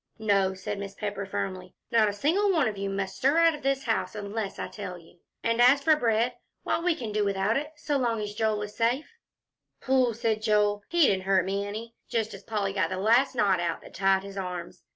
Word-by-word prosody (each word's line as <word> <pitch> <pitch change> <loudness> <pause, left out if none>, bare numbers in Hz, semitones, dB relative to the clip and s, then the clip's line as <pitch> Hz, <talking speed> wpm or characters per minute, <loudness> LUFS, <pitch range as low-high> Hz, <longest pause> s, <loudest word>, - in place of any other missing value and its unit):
"No," 200 -3 +2
said 195 +2 -5
Mrs. 200 0 -7
Pepper, 200 -2 -4
firmly, 185 -1 -4 0.2
"not 220 -2 +4
a - - -3
single 345 - +2
one 320 -8 +2
of 215 - -2
you 195 0 -3
must 195 -1 -3
stir 275 +5 +2
out 335 -1 +5
of 300 - -8
this 275 -1 0
house 225 -2 -1
unless 205 0 -4
I - - -4
tell 190 -4 -7
you. 170 +1 -19 0.2
And 230 +1 +1
as 270 +3 +6
for 310 +1 +5
bread, 235 -2 +1 0.3
why, - - 0
we 340 0 +1
can 230 -7 -5
do 210 0 +1
without 200 +2 +1
it 295 +2 -2
so 295 -1 -1
long 235 -4 0
as 210 -1 -4
Joel 215 -1 0
is 210 0 -8
safe." 245 - 0 0.7
"Phooh!" 255 -3 +2
said 225 -2 0
Joel, 210 -1 +2
"he 345 0 +1
didn't 190 -5 +1
hurt 190 -2 +3
me 200 +1 -2
any," 225 +3 -6 0.2
just 225 -2 -1
as - - -9
Polly 205 -3 -2
got 195 - 0
the 185 - -3
last 235 +7 +3
knot 200 -6 +3
out 170 -1 -2
that - - -13
tied 195 0 +2
his 200 0 -9
arms. 180 -2 -5
210 Hz, 230 wpm, -27 LUFS, 195-245 Hz, 0.7 s, as